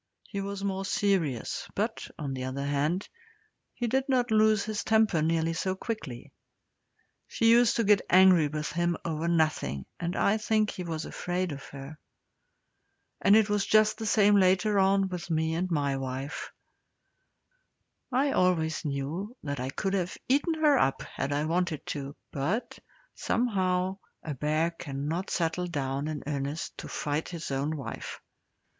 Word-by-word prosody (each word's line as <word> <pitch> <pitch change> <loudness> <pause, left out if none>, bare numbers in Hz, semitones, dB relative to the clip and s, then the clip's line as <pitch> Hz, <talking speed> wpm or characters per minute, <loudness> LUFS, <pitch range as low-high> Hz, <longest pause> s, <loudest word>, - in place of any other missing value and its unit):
He 200 - -5
was 200 0 -5
more 195 -1 -1
serious, 185 - 0
but, - - -2
on 140 -3 -4
the 130 -1 -4
other 135 +2 -3
hand, 145 +7 0 0.6
he 240 - -3
did 265 +4 0
not 250 -3 +2
lose 215 -1 +4
his 215 -1 -3
temper 220 -7 +3
nearly 165 +1 +1
so 185 +3 -1
quickly. 175 - -6 1.0
She 230 0 +3
used 235 0 +5
to 230 - +2
get 205 -1 +5
angry 185 -4 +6
with 150 +1 -3
him 175 0 0
over 165 0 -2
nothing, 155 - +1
and 175 +1 -2
I 205 +2 +3
think 215 -1 +1
he - - -7
was 165 -2 -4
afraid 180 0 -2
of 140 -1 -7
her. 140 +2 -9 1.2
And 200 - +6
it 220 -1 +5
was 205 -1 +1
just 215 +1 +3
the 220 - -3
same 205 -1 +5
later 190 +2 +3
on 195 0 +3
with 180 -2 -6
me 160 0 +1
and 180 +3 -1
my 145 -4 0
wife. 135 +2 -5 1.6
I 270 +3 +2
always 165 -6 +1
knew 155 - -4
that 140 -2 -3
I 130 +1 -2
could 195 +8 -2
have 185 -1 -1
eaten 290 +6 +2
her 300 -4 +4
up 135 - +1
had 140 - -4
I 145 +1 0
wanted 170 -1 -1
to, 140 -1 -6 0.2
but, 165 - -2 0.3
somehow, 190 -5 0 0.2
a 155 - -4
bear 155 +4 0
cannot 155 +3 -4
settle 175 +1 -1
down 140 -3 -2
in 155 -3 -4
earnest 145 +2 -3
to - - -6
fight 150 +1 -2
his 165 -4 -6
own 140 +3 -1
wife. 125 -5 -6
175 Hz, 160 wpm, -28 LUFS, 150-205 Hz, 1.6 s, angry